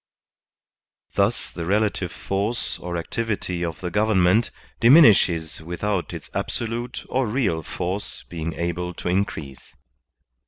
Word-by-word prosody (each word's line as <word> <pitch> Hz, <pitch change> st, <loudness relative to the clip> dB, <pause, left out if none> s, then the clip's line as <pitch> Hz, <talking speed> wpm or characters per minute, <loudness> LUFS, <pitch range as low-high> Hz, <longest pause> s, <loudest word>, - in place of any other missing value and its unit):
Thus -, -, +1 dB
the 85 Hz, -, -5 dB
relative 100 Hz, -1 st, 0 dB
force 100 Hz, +7 st, -2 dB
or 85 Hz, 0 st, -4 dB
activity 95 Hz, -1 st, -2 dB
of 85 Hz, -2 st, -4 dB
the 90 Hz, -1 st, -3 dB
government 105 Hz, +1 st, +3 dB, 0.3 s
dimin 140 Hz, +8 st, +8 dB
ishes 85 Hz, -, +3 dB
without 90 Hz, +3 st, -2 dB
its -, -, -7 dB
absolute 120 Hz, +1 st, -3 dB
or 130 Hz, -2 st, 0 dB
real 105 Hz, -8 st, 0 dB
force 90 Hz, +5 st, -4 dB
being 85 Hz, -1 st, -5 dB
able 85 Hz, +2 st, -3 dB
to -, -, -3 dB
in 95 Hz, +3 st, +3 dB
crease. 70 Hz, -8 st, -10 dB
95 Hz, 125 wpm, -24 LUFS, 85-110 Hz, 0.3 s, dimin